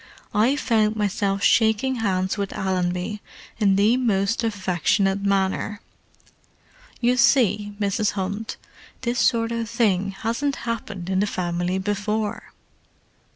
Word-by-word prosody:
"I 225 +7 +3
found 220 -6 +1
myself 200 -1 -1
shaking 225 +3 +3
hands 190 -4 0
with 200 -2 -3
Allenby 185 +2 -1 0.4
in 200 -3 +4
the 210 +5 +4
most 215 -2 +1
affectionate 195 -1 +1
manner. 200 +1 0 1.2
You 245 +1 +2
see, 210 -5 +3
Mrs. 205 +1 0
Hunt, 200 +3 -4 0.4
this 240 -1 -1
sort 230 -2 +2
of 230 -1 -3
thing 205 -5 +1
hasn't 235 +8 -2
happened 205 -6 -4
in 190 - +1
the 205 - +1
family 175 -1 -2
before." 205 +2 -2
205 Hz, 115 wpm, -23 LUFS, 195-230 Hz, 1.2 s, in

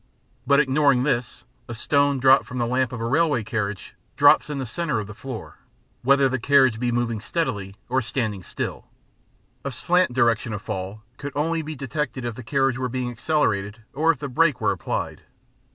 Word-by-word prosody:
But, 140 +1 +5
ignoring 140 -2 +3
this, 125 -5 -2 0.2
a 120 - -6
stone 140 +4 +2
dropped 130 +1 +5
from 125 - -6
the 120 - +1
lamp 125 +1 0
of 125 - -5
a 115 - -2
railway 145 -2 +2
carriage 105 -2 -3 0.2
drops - - +5
in 145 - -3
the 135 - -3
centre 150 0 -2
of 105 - -4
the 105 - -9
floor, 115 +2 -8 0.4
whether 140 +1 +4
the 130 0 -1
carriage 130 -3 +4
be 120 0 0
moving 120 -3 -1
steadily 105 - -3
or 130 +2 +1
standing 115 -5 -2
still; - - -5 0.8
a - - -3
slant 180 -4 +2
direction 120 -2 +2
of 105 - -4
fall 100 0 -5
could 140 +1 -6
only 165 +3 0
be 155 0 -6
detected 135 -1 -3
if 120 - -2
the 130 - -9
carriage 135 +1 0
were 130 -1 -1
being 125 0 -3
accelerated 110 -6 -1
or 155 +4 +1
if 165 - +4
the 140 - -5
brake 145 +1 +2
were - - +2
applied. - - -3
130 Hz, 190 wpm, -24 LUFS, 115-140 Hz, 0.8 s, But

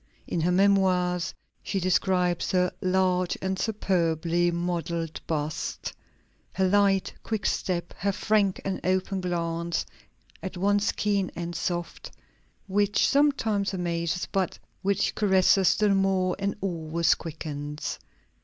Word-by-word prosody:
In 170 - -2
her 175 +3 +2
Memoirs 185 -2 +3 0.3
she 195 - -2
describes 180 -1 +1
her 180 -1 +3
"large 185 -1 +1
and 190 0 -2
superbly 175 -5 +1
modelled 170 -2 -2
bust, 155 -1 -3 0.6
her 190 0 +2
light, 195 0 +3
quick 220 -2 -3
step, 175 -2 -1
her 200 +2 +1
frank 205 -1 +1
and 195 -1 -2
open 185 +1 0
glance, 170 -1 -2 0.6
at 190 -2 -6
once 205 +3 +2
keen 200 -3 0
and 170 0 -4
soft, 175 +1 -3 0.6
which 205 +1 +2
sometimes 225 -9 +2
amazes, 170 -1 -1
but 190 -3 0 0.2
which 200 0 +1
caresses 190 -2 +4
still 210 -2 +3
more, 190 -1 +2
and 200 0 -1
always 170 -3 +1
quickens." 150 -2 -5
185 Hz, 115 wpm, -27 LUFS, 170-195 Hz, 0.6 s, caresses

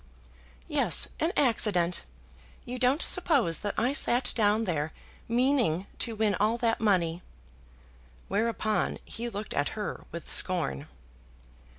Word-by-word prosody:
"Yes, - - +2
an 325 +3 +1
accident. 205 -9 +2 0.6
You 250 +1 -5
don't 260 +4 +3
suppose 275 - +2
that 205 - -3
I 245 +5 +1
sat 250 -3 +1
down 215 0 +2
there 160 -5 -2 0.3
meaning 240 - +1
to 230 -2 -1
win 215 -1 +1
all 215 +3 +2
that 230 -1 0
money?" 180 -5 +1 1.1
Whereupon 215 +1 0
he 235 +2 -5
looked 210 -1 -6
at 145 - 0
her 210 - -5
with 170 0 -8
scorn. 160 -5 +2
215 Hz, 120 wpm, -28 LUFS, 180-240 Hz, 1.1 s, don't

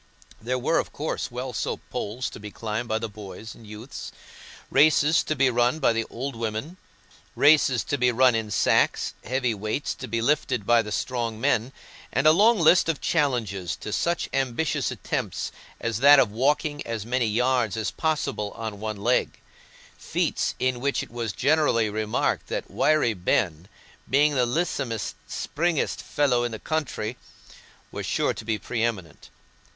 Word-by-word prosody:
There 125 +3 -1
were, 130 +6 +1
of - - -3
course, 155 +2 -3
well 125 +1 -5
soaped - - -3
poles 120 +5 -3
to - - -9
be 105 0 -8
climbed 110 +3 -4
by 110 - +1
the 115 0 -3
boys 105 +1 -9
and 110 - -15
youths, 110 +5 -8 0.6
races 150 +2 +5
to 155 - -1
be 135 -2 +3
run 120 +4 +2
by 155 - +2
the 115 0 -1
old 135 +3 -5
women, 115 +9 -4 0.6
races 145 -4 +4
to 145 - -2
be 125 0 +3
run 125 +1 +4
in 110 -1 -2
sacks, 100 - +2
heavy 125 -1 0
weights 110 +7 -3
to 130 - -8
be 115 0 -1
lifted 125 -4 0
by 120 +1 +5
the 105 -1 -7
strong 115 -1 -2
men, 115 +2 +1 0.4
and 140 - 0
a 155 - +8
long 215 +8 +5
list 170 0 +5
of 160 - 0
challenges 115 - 0
to 105 - -7
such 170 -1 0
ambitious 135 +3 0
attempts - - -3 0.3
as 115 -2 -2
that 145 +2 +8
of 120 -6 +4
walking 145 +5 0
as 115 -2 -4
many 125 0 0
yards 115 -2 +1
possible 140 -10 -2
on 110 -3 -5
one 110 0 -4
leg—feats 120 +5 -2
in 130 -1 0
which 140 +1 0
it - - -12
was 115 -3 -3
generally 135 -5 +2
remarked 110 0 -1
that - - -4
Wiry 155 -7 +2
Ben, 90 -2 0 0.4
being 145 +4 +4
"the 125 -3 +2
lissom'st, 130 - -2
springest 165 0 -1
fellow 130 -5 +1
i' - - +1
the 115 -2 -6
country," 130 -6 -3 0.7
was - - -5
sure - - +1
to - - -8
be 110 0 -1
pre 115 +1 -4
eminent. 95 -10 -4
120 Hz, 165 wpm, -25 LUFS, 110-140 Hz, 0.7 s, a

